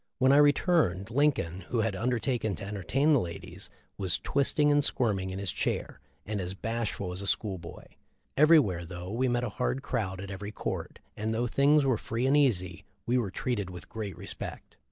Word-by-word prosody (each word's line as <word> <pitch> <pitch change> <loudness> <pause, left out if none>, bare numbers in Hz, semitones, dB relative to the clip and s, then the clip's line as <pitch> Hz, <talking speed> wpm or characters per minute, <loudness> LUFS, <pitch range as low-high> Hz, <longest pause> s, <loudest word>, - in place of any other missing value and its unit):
When 130 0 +4
I 140 - +6
returned, 145 - +3
Lincoln, 120 - +1
who 120 - 0
had 110 -2 0
under 120 +5 0
taken 115 -4 -1
to - - -8
entertain 105 - +1
the 140 - +5
ladies, 85 -5 -6 0.3
was 95 -3 0
twisting 145 +2 +2
and 145 0 +4
squirming 105 -9 0
in 95 - -5
his 100 -2 -2
chair, - - -2 0.3
and 105 -1 -2
as 90 +1 -4
bashful 110 -3 -3
as 90 - -4
a 100 - -2
school 100 -4 +1
boy. 85 0 -10 0.5
Everywhere, 140 - +5
though 90 +2 -7
we 125 +4 +1
met 120 0 +1
a 120 - -1
hard 125 +5 -2
crowd 100 -9 -2
at 100 +1 -6
every 100 +2 -6
court, - - -4 0.2
and 110 +1 -2
though 120 +2 0
things 140 +4 +4
were 130 -4 +2
free 115 +3 -2
and 135 +2 +4
easy, 95 - +1 0.2
we 125 +2 +2
were 110 -5 -1
treated 105 -1 -2
with 90 -1 -10
great 105 -6 -5
respect." - - -7
110 Hz, 195 wpm, -29 LUFS, 95-130 Hz, 0.5 s, I